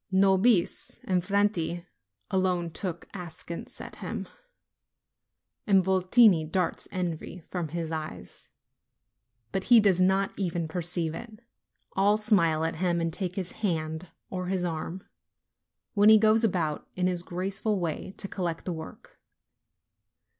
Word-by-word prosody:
Nobis 190 +1 +3
and 180 -2 +1
Franti 185 -4 0 0.5
alone 180 -3 +1
look 175 -3 -4
askance 170 -2 -7
at - - -9
him, - - -5 1.4
and 195 -2 +5
Votini 190 0 +5
darts 170 +3 -2
envy 180 -1 -4
from 175 -3 -2
his 165 +1 -4
eyes: 155 -1 -7 1.0
but 190 -1 -2
he 240 -1 +8
does 195 -4 +3
not 190 +1 +2
even 175 -3 -1
perceive 170 -1 -1
it. 215 +4 -8 0.5
All 200 +2 +3
smile 170 -8 +3
at 165 - -2
him, 175 0 +1
and 165 -1 -1
take 185 -1 -1
his 185 -3 -3
hand 160 -3 -2 0.2
or 185 -1 -3
his 185 -1 0
arm, 170 +3 -4 0.9
when 205 0 +6
he 220 - +9
goes 220 +1 +4
about, 170 -8 0
in 180 - 0
his 180 -1 +1
graceful 195 +4 -1
way, 175 +2 -4
to 195 - -2
collect 175 -4 -3
the 180 - -2
work. 160 -1 -10
180 Hz, 130 wpm, -28 LUFS, 170-195 Hz, 1.4 s, he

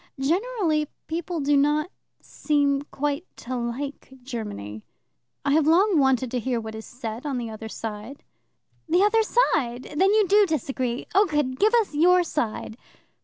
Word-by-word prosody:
Generally 335 - 0 0.2
people 335 +1 -3
do 285 +1 +2
not 295 +4 +2 0.3
seem 285 -2 0
quite 290 +3 -2
to 255 +2 -6
like 250 +4 -5
Germany. 205 - -6 0.6
I 280 - +2
have 310 0 +3
long 360 +2 +4
wanted 265 -2 +2
to 250 - -1
hear 240 +1 -1
what 220 -1 -7
is 220 0 -8
said 235 -1 -6
on 285 -4 -2
the 235 -2 -4
other 220 0 -8
side." 220 +5 -7 0.7
"The 350 +4 +4
other 435 +2 +4
side? 295 - 0
Then 380 +5 +4
you 425 -2 +3
do 410 +2 +5
disagree. 260 -5 -2
Oh, 400 +2 +5
good! 295 -5 -1
Give 435 +3 +4
us 450 -8 +1
your 355 +4 +5
side." 230 -8 -3
285 Hz, 160 wpm, -25 LUFS, 240-345 Hz, 0.7 s, do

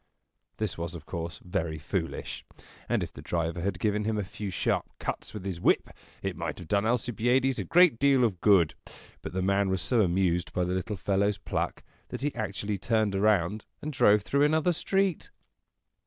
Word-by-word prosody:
This 105 -6 -3
was 85 0 -4
of 80 -3 -9
course 85 -1 -5
very 80 -3 -2
foolish; 80 +2 -4 0.5
and - - +1
if - - -6
the - - -9
driver 85 0 -2
had 95 0 -1
given 105 +2 0
him 110 0 -1
a 105 - 0
few 100 +1 -6
sharp 90 - -1
cuts - - -4
with 105 -3 -7
his 90 -3 -4
whip, - - +2 0.3
it - - -2
might - - -4
have 90 - -9
done 100 +5 +1
Alcibiades 125 +2 +1
a - - -1
great 175 -9 +5
deal 135 -2 +4
of 100 -7 0
good. 95 -7 +5 0.5
But 80 - -7
the 95 0 -1
man 100 +1 +2
was 95 0 0
so 110 +5 +2
amused 90 -2 +1
by 90 - +1
the 90 +1 -1
little 95 +3 -2
fellow's 100 +2 +1
pluck, 100 - -3 0.3
that - - -5
he 145 0 -1
actually 105 -2 -3
turned 110 -2 +1
around 100 0 +2
and 150 0 -5
drove 105 -5 +5
through 140 +7 +1
another 160 +4 +3
street. 190 +1 0
100 Hz, 190 wpm, -28 LUFS, 90-115 Hz, 0.5 s, great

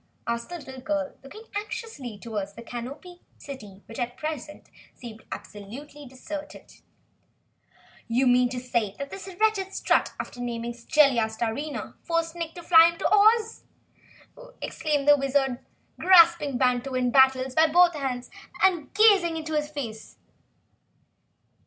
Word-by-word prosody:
asked 235 0 -3
the 350 - -5
little 265 -4 -10
girl, 290 +1 -2
looking 430 +11 -11
anxiously 425 - -6
toward 210 -3 -4
the 235 - -10
Canopied 275 +10 -8 0.2
City 210 -8 -11
which, 225 - -10
at 245 0 -3
present, 305 -1 -6 0.3
seemed 225 -3 -11
absolutely 275 +8 -9
deserted. 290 +4 -9 1.3
"You 245 +1 +3
say 235 -5 -2
that 280 0 -6
this 390 0 -8
wretched 410 -3 +1
Strut, - - +1
after 245 - -6
naming 235 -1 -4
Jellia 245 0 +3
Starina, 235 +7 -4
forced 330 -1 -1
Nick 335 -1 -5
to 345 - -9
fly 330 -1 +7
him 335 - -8
to - - -1
Oz?" 435 +2 +4 1.0
exclaimed 295 -3 -2
the 290 0 +7
Wizard, 270 -2 0 0.4
grasping 335 -7 +5
Wantowin 250 0 +1
Battles 265 -1 +4
by 320 +4 +5
both 345 +1 +5
arms 260 -4 -4 0.3
and 355 -6 +2
gazing 395 -6 +5
into 315 0 -5
his 300 -1 -1
face. 240 -8 -7
280 Hz, 130 wpm, -26 LUFS, 245-330 Hz, 1.3 s, fly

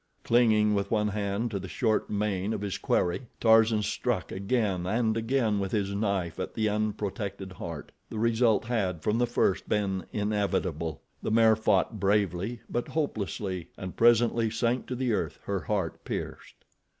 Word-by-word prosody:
Clinging 110 -3 +4
with 100 -1 0
one 105 -2 +1
hand 105 +2 -2
to 100 - -2
the 95 - -7
short 110 +3 0
mane 105 -1 -1
of - - -3
his 100 -2 -3
quarry, 90 +8 0
Tarzan 110 -1 +5
struck - - -1
again 100 -2 0
and 110 +2 +1
again 115 -2 +1
with 95 -1 -2
his 100 -2 0
knife 100 -5 -1
at - - -4
the 110 -1 +1
unprotected 105 -2 -3
heart. 85 -4 -7 0.2
The 110 - -6
result 115 -1 +2
had, 95 -9 -1
from 105 +2 +1
the 120 - +2
first, 110 -5 0
been 95 -3 0
inevitable. 100 -7 -1 0.2
The - - -2
mare 110 0 +5
fought 110 0 +1
bravely, 100 +2 0
but 120 - -2
hopelessly, 100 - -3
and 95 -1 -6
presently 115 -1 +4
sank 115 +3 0
to 125 - -3
the 125 -2 0
earth, 80 -7 -2
her 100 -1 -1
heart 95 -2 -2
pierced. - - -5
105 Hz, 160 wpm, -28 LUFS, 95-115 Hz, 0.2 s, Tarzan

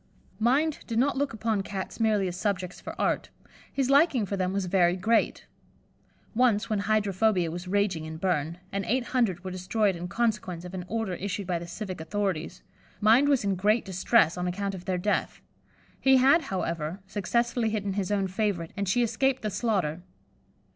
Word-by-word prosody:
Mind 280 +7 +2
did 230 - -2
not 275 +4 +2
look 280 0 0
upon 220 -2 -1
Cats 195 +1 -6
merely 215 -4 +2
as 175 - -4
subjects 185 -2 -2
for - - -8
art; - - 0 0.4
his 270 -1 0
liking 280 -5 +4
for 200 - -3
them 185 -1 -1
was 195 -1 -1
very 175 -1 +3
great. 220 +5 +1 0.9
Once 235 -2 +2
when 210 - +1
hydrophobia 200 -3 +1
was 175 +2 -6
raging 190 -4 0
in 160 0 -6
Berne, 165 -2 -1
and 200 0 -2
eight 255 +2 +1
hundred 200 -9 +1
were 185 - -5
destroyed 190 +2 0
in 175 +1 -5
consequence 190 -5 -1
of 180 - -8
an 180 -2 -5
order 220 -2 -2
issued 195 +2 -4
by 175 -2 -1
the 170 - -8
civic 185 -1 -6
authorities, 185 -1 -3 0.4
Mind 235 +7 +5
was 275 -5 +3
in 200 -1 +1
great 210 +5 +2
distress 185 -2 +2
on 180 - -1
account 195 +2 -2
of 180 -2 -8
their 185 -1 0
death. 205 +4 -1 0.6
He 265 0 +5
had, 275 +6 +5
however, 170 -2 -3
successfully 235 +4 0
hidden 205 -2 -2
his 200 0 -2
own 200 -2 +1
favourite, 185 -4 -2
and 200 -2 -2
she 240 +5 +3
escaped 260 +3 0
the 215 - -1
slaughter. 190 -6 -1
200 Hz, 180 wpm, -27 LUFS, 180-225 Hz, 0.9 s, Mind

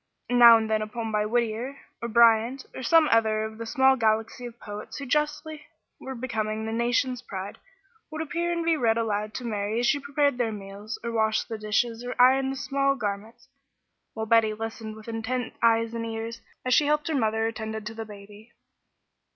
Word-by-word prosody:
Now 240 -2 +9
and 220 -1 -2
then 220 0 +1
a - - -1
new 215 - -15
poem 225 -1 -4
by 210 0 0
Whittier, 240 +3 -1 0.2
or 235 - -2
Bryant, 235 +3 +4
or - - -7
some 315 +5 +5
other 220 -1 +3
of 220 0 -7
the 230 - -5
small 265 +1 +4
galaxy 225 +1 0
of 235 0 -13
poets 205 0 -8
who 280 - -6
justly 300 +2 -2 0.3
were 265 0 -7
becoming 220 -3 -3
the 220 - -3
nation's 245 +2 0
pride, 195 -4 -7 0.5
would 310 -1 -6
appear 340 +2 -2
and 335 -1 -2
be 330 -1 +3
read 230 -6 +2
aloud 215 -1 -2
to 255 - -5
Mary 210 0 -2
as 245 - +1
she 285 +4 +2
prepared 280 -2 0
their 230 -2 +1
meals, 205 +1 -7
or 235 - -3
washed 220 0 0
the 225 - -4
dishes 225 +2 -1
or 245 0 -6
ironed 265 +2 +4
small 275 0 0
garments, 220 +2 -5 0.7
while 220 -1 -3
Betty 220 -1 +3
listened 220 0 -6
with 220 +1 -13
intent 230 +2 -3
eyes 230 0 +3
and 230 0 -3
ears, 230 0 -5 0.2
as 255 - +2
she 290 +2 +4
helped 300 0 +1
her 320 - -1
mother 220 -3 +1
or 225 - 0
tended 220 -1 -6
the 225 +1 -5
baby. 210 +1 -13
230 Hz, 200 wpm, -26 LUFS, 220-255 Hz, 0.7 s, Now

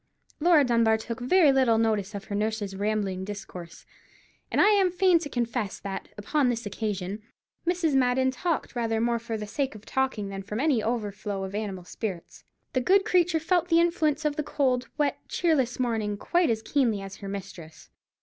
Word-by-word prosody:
Laura 325 -2 +5
Dunbar 230 -3 +3
took 230 +2 -6
very 295 +4 +5
little 260 -4 +3
notice 215 -2 0
of 200 - -5
her 205 - -7
nurse's 210 -1 -2
rambling 200 -2 -1
discourse; 190 -4 -8 0.6
and - - 0
I - - +6
am 400 -3 +4
fain 360 -1 +4
to 295 - -6
confess 235 -5 -2
that, 195 -1 -5
upon 255 +6 +1
this 235 -1 -2
occasion, 205 -1 -3 0.5
Mrs. 345 -4 +1
Madden 260 0 +3
talked 310 +1 -2
rather 225 -2 0
more 235 +1 +1
for 230 -1 -4
the 210 - -5
sake 265 +4 -2
of 215 0 -12
talking 260 -7 -1
than 195 0 -5
from 210 +3 -5
any 275 -5 +2
overflow 210 -3 -3
of 190 0 -6
animal 200 -3 -4
spirits. 180 0 -6 0.3
The 255 - +1
good 385 +9 +4
creature 355 -5 +3
felt 350 +1 +1
the 335 -1 +4
influence 320 -3 +1
of 295 -1 0
the - - +1
cold, 255 -4 0
wet, 295 -2 0
cheerless 275 -9 +1
morning 220 -4 -1
quite 345 - +1
as 220 -1 -1
keenly 235 -8 +1
as 195 0 -8
her 195 - -7
mistress. 190 -5 -9
235 Hz, 185 wpm, -27 LUFS, 205-295 Hz, 0.6 s, I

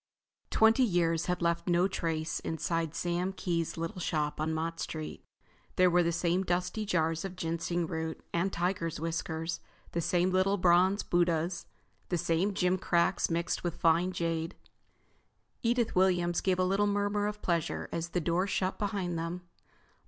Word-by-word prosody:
wenty 225 +4 +5
years 170 -6 +1
had 180 -1 -1
left 170 +1 0
no 175 +1 +3
trace 165 -4 -2
inside 165 0 -2
Sam 175 +2 -1
Kee's 170 -4 -2
little 165 +3 -4
shop 150 -2 -1
on 160 +1 0
Mott 165 +1 -2
Street. 155 -1 -5 0.5
There 180 -1 +5
were 180 +1 +5
the 170 0 +1
same 170 +2 +1
dusty 180 +4 -1
jars 165 -3 +1
of 190 -1 -5
ginseng 170 0 -1
root 160 0 -4
and 175 +3 +1
tigers' 175 -3 -1
whiskers, 165 0 -3 0.3
the 170 - -1
same 180 +2 +2
little 190 +2 +2
bronze 185 +2 +4
Buddahs, 170 0 0 0.4
the 175 - +1
same 170 +4 +1
gim 185 -2 +1
cracks 175 0 +2
mixed 170 0 -1
with 175 -2 -2
fine 170 +2 +3
jade. 165 -1 -2 1.1
Edith 235 0 +1
Williams 175 -2 +2
gave 185 -2 +1
a 185 - +2
little 195 +3 +2
murmur 205 0 0
of 210 0 -5
pleasure 170 -3 -1
as 170 0 -3
the 180 - 0
door 175 +3 +1
shut 190 -1 -1
behind 190 -5 -2
them. 170 +2 -4
175 Hz, 160 wpm, -31 LUFS, 165-185 Hz, 1.1 s, wenty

